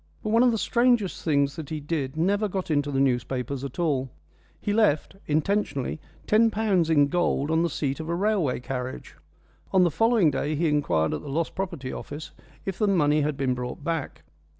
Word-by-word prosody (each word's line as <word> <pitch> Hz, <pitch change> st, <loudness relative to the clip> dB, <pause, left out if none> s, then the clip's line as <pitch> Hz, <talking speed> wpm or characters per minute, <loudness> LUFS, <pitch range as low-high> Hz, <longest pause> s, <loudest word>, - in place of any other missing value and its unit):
But 215 Hz, -, -2 dB
one 230 Hz, +2 st, +5 dB
of 250 Hz, -, +6 dB
the 230 Hz, -, +1 dB
strangest 235 Hz, -3 st, +1 dB
things 140 Hz, -3 st, +1 dB
that 155 Hz, -4 st, -6 dB
he 155 Hz, -, -3 dB
did 145 Hz, -2 st, -3 dB
never 200 Hz, +6 st, +2 dB
got 190 Hz, -3 st, -3 dB
into 145 Hz, -1 st, +1 dB
the 135 Hz, -1 st, 0 dB
newspapers 130 Hz, +1 st, -1 dB
at 140 Hz, -2 st, -6 dB
all. 140 Hz, -7 st, 0 dB, 0.5 s
He 205 Hz, -, -1 dB
left, 205 Hz, -6 st, +2 dB
intentionally, 155 Hz, -3 st, 0 dB, 0.3 s
ten 225 Hz, +2 st, +4 dB
pounds 200 Hz, -6 st, +1 dB
in 145 Hz, -3 st, +5 dB
gold 160 Hz, -3 st, 0 dB
on 160 Hz, 0 st, +3 dB
the 170 Hz, -, +1 dB
seat 140 Hz, -2 st, -2 dB
of 160 Hz, 0 st, -5 dB
a 170 Hz, -, 0 dB
railway 190 Hz, -10 st, 0 dB
carriage. 130 Hz, 0 st, -5 dB, 0.6 s
On 185 Hz, -1 st, +5 dB
the 175 Hz, -, +3 dB
following 225 Hz, -, +3 dB
day 145 Hz, +3 st, -1 dB
he 165 Hz, +3 st, +1 dB
inquired 145 Hz, -, +1 dB
at -, -, -3 dB
the 145 Hz, -, -8 dB
Lost 160 Hz, +4 st, -1 dB
Property 170 Hz, -9 st, -4 dB
Office 145 Hz, +2 st, -7 dB, 0.3 s
if 195 Hz, -2 st, -4 dB
the 210 Hz, -, +2 dB
money 150 Hz, -6 st, +3 dB
had 145 Hz, -1 st, -1 dB
been 135 Hz, -2 st, +1 dB
brought 125 Hz, +3 st, -5 dB
back. 165 Hz, -2 st, -3 dB
155 Hz, 195 wpm, -26 LUFS, 140-195 Hz, 0.6 s, of